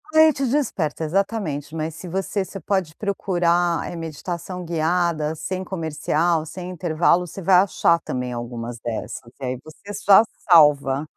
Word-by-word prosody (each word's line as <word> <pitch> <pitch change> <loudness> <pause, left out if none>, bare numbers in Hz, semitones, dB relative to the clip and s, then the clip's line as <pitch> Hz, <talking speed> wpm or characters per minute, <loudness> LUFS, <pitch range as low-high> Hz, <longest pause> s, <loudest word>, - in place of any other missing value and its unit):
Aí 315 0 +7
te 275 0 -2
desperta, 230 - -1
exatamente, 165 -4 -2
mas 160 0 -3
se 180 - -9
você 190 +2 -2
você 195 - -8
pode 180 -3 -1
procurar, 175 -4 0
eh, - - -7
meditação 170 +3 -5
guiada, 165 -1 0
sem 185 +4 -4
comercial, 160 -1 0
sem 180 +3 -7
intervalo, 175 0 +1
você 195 - -8
vai 185 +1 +4
achar 175 -3 +3
também 125 -5 -4
algumas 120 0 -6
dessas. 115 -1 -5 0.2
E 135 - -9
aí 125 0 -3
você 200 +6 -11
só 200 +1 +6 0.3
salva. 145 -3 +5
170 Hz, 150 wpm, -22 LUFS, 155-185 Hz, 0.3 s, Aí